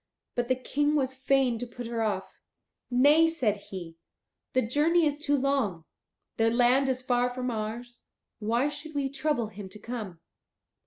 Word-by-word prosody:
But 245 Hz, -1 st, -1 dB
the 255 Hz, -, +2 dB
King 290 Hz, +4 st, 0 dB
was 265 Hz, -3 st, +1 dB
fain 265 Hz, -3 st, +2 dB
to 245 Hz, -, -4 dB
put 240 Hz, +1 st, -8 dB
her 230 Hz, 0 st, -2 dB
off. 195 Hz, -3 st, -3 dB, 0.5 s
"Nay," 290 Hz, +6 st, +5 dB
said 255 Hz, -11 st, 0 dB
he, 170 Hz, -4 st, -7 dB, 0.6 s
"the 255 Hz, -, +3 dB
journey 315 Hz, +7 st, +3 dB
is 295 Hz, -1 st, 0 dB
too 290 Hz, -1 st, +1 dB
long. 255 Hz, -, 0 dB, 0.5 s
Their 225 Hz, 0 st, +4 dB
land 250 Hz, +3 st, +4 dB
is 255 Hz, 0 st, -1 dB
far 245 Hz, -1 st, +2 dB
from 250 Hz, 0 st, -3 dB
ours; 230 Hz, +2 st, -5 dB, 0.3 s
why 230 Hz, +5 st, +1 dB
should 295 Hz, +1 st, -7 dB
we 275 Hz, -1 st, 0 dB
trouble 275 Hz, -5 st, -1 dB
him 200 Hz, -2 st, -9 dB
to 210 Hz, -, -11 dB
come? 210 Hz, -6 st, -6 dB
250 Hz, 165 wpm, -28 LUFS, 225-280 Hz, 0.6 s, Nay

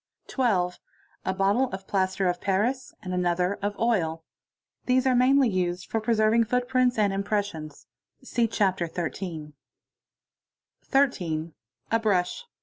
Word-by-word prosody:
12. 185 Hz, -9 st, 0 dB, 0.5 s
A 190 Hz, -, 0 dB
bottle 200 Hz, +7 st, +2 dB
of 190 Hz, 0 st, -7 dB
plaster 190 Hz, -1 st, 0 dB
of 180 Hz, 0 st, -1 dB
paris 230 Hz, +7 st, -1 dB
and 185 Hz, -, -4 dB
another 180 Hz, +1 st, 0 dB
of 205 Hz, 0 st, -2 dB
oil. 165 Hz, -9 st, 0 dB, 0.6 s
These 255 Hz, +1 st, +3 dB
are 260 Hz, -, +4 dB
mair 255 Hz, +3 st, +4 dB
of 275 Hz, -, +5 dB
use 180 Hz, -4 st, -1 dB
for 225 Hz, -, -2 dB
preserving 220 Hz, 0 st, +3 dB
footprints 250 Hz, +1 st, +1 dB
and 205 Hz, -2 st, +2 dB
impressions 195 Hz, -7 st, -3 dB, 0.4 s
(see 240 Hz, -3 st, 0 dB
Chapter 190 Hz, -5 st, 0 dB
XII1.) 160 Hz, -2 st, -5 dB, 0.7 s
— -, -, -46 dB
13. 170 Hz, -, +1 dB, 0.4 s
A 225 Hz, -, +3 dB
brush. 210 Hz, -, 0 dB
200 Hz, 135 wpm, -26 LUFS, 180-240 Hz, 0.7 s, of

